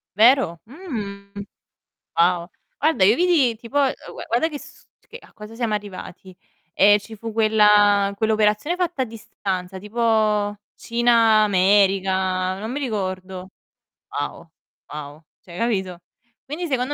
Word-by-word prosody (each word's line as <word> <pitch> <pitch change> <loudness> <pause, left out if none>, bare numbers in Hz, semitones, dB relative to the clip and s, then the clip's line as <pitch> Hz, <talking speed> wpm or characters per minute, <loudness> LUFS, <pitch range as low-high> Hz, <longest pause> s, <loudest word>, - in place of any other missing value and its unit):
Vero? 225 -7 +4
Mhmm, 220 - -7 0.9
wow. 175 0 +2 0.3
Guarda, 300 -10 +2
io 210 +4 +6
vidi 315 -10 +2
tipo, 235 +5 -4
ehm, 275 -2 +2 0.2
u - - -10
e - - -8
guarda 240 +8 +1
che 295 -2 -7
s - - -15 0.2
che 470 - -10
a - - -20
cosa 210 +1 -11
siamo 230 -3 -2
arrivati. 190 -2 -8 0.4
Ehm, 205 +1 +5
ci 220 +2 -12
fu 225 +1 -7
quella 210 -2 +4
quell'operazione 220 - +1
fatta 345 -7 -1
a - - +1
distanza, 190 -4 -6
tipo 210 -1 0 0.2
Cina, 230 -2 +3
America, 190 -1 +2
non 220 +3 -5
mi 290 - -3
ricordo. 185 -5 -4 0.6
Wow, - - -5 0.4
wow, 150 +1 -8 0.2
cioè 175 -1 -12
capito? 190 -7 -2 0.5
Quindi, 315 +5 -5
secondo 265 0 -1
210 Hz, 135 wpm, -22 LUFS, 190-240 Hz, 0.9 s, io